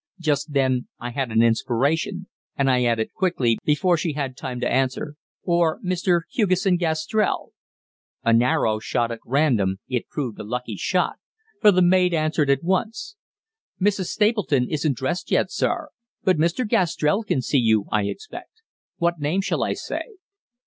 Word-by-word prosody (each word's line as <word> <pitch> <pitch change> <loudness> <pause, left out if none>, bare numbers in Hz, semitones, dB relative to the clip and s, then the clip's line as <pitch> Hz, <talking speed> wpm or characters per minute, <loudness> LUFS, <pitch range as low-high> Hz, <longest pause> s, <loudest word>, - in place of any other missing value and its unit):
Just 150 -2 -1
then 130 -3 +1
I 120 +1 -5
had 130 0 -2
an 110 +1 +4
inspiration, 140 - 0 0.3
and 135 -1 +3
I 125 -1 +2
added 115 -2 0
quickly, 165 - +1
before 170 +4 +2
she 160 -1 -2
had 135 -3 -3
time 130 -3 -5
to 120 - +1
answer, 130 +3 0 0.3
"or 170 -2 +1
Mr. 180 -1 +1
Hugesson 185 -3 +2
Gastrell?" 170 +5 -1 0.7
An 115 0 +4
arrow 110 -3 +1
shot 115 +2 -1
at 115 - -5
random, 120 -9 +1
it 125 -2 -2
proved 125 -7 -4
a - - -5
lucky 120 0 -4
shot, 180 - 0 0.4
for 210 - +7
the 185 -1 +3
maid 180 0 +4
answered 155 -2 +1
at 140 +1 +2
once: 220 - -2 0.6
"Mrs. 200 -1 +1
Stapleton 210 - +1
isn't 150 -3 0
dressed 135 +7 -3
yet, - - +1
sir; - - -1 0.3
but 185 -2 +3
Mr. 170 +10 +1
Gastrell 175 +1 +1
can 135 -11 -1
see 140 - +2
you, 110 -4 +2
I 105 -1 +1
expect. 435 - -8 0.3
What 170 -1 0
name 155 +7 0
shall - - -1
I - - 0
say?" 450 - -6
150 Hz, 160 wpm, -23 LUFS, 125-180 Hz, 0.7 s, for